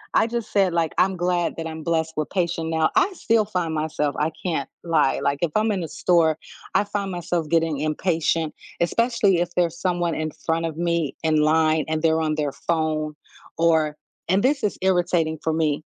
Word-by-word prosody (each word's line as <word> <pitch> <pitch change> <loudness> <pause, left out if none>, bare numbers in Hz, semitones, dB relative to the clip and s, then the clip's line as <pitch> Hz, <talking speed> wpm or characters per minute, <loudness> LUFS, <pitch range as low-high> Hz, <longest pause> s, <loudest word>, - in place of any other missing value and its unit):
I - - +4
just 235 -1 -4
said 195 -4 +3
like, 165 -2 0
"I'm 190 0 +3
glad 175 -1 0
that 165 - -4
I'm 160 0 -7
blessed 160 -1 0
with 155 - -1
patient 170 -3 -1
now," 160 -1 +2
I 400 - +4
still 225 -7 +2
find 180 -6 -2
myself 150 -2 -1
I 155 +2 +1
can't 160 -7 -1 0.2
lie, 160 -5 +2
like, 140 0 0
if 170 - +1
I'm 215 0 +2
in 195 - -1
the 165 - -4
store, 165 -3 +2 0.4
I 205 - +4
find 200 -1 -3
myself 175 -3 -2
getting 165 -3 +1
impatient, 160 +1 0 0.3
especially 210 0 +2
if 175 - -1
there's 170 -1 0
someone 175 -2 0
in 155 0 -2
front 165 +2 -2
of 160 -2 -4
me 170 -3 0
in 160 -1 +2
line 155 0 +3
and 155 0 -1
they're 160 -1 +2
on 155 -1 0
their 145 -2 -1
phone 155 -2 -1 0.4
or 160 -2 +2 0.3
and 190 +2 +3
this 275 +2 +2
is 210 - 0
irritating 175 -4 +1
for 160 - 0
me, 155 -2 0
165 Hz, 195 wpm, -23 LUFS, 155-180 Hz, 0.4 s, I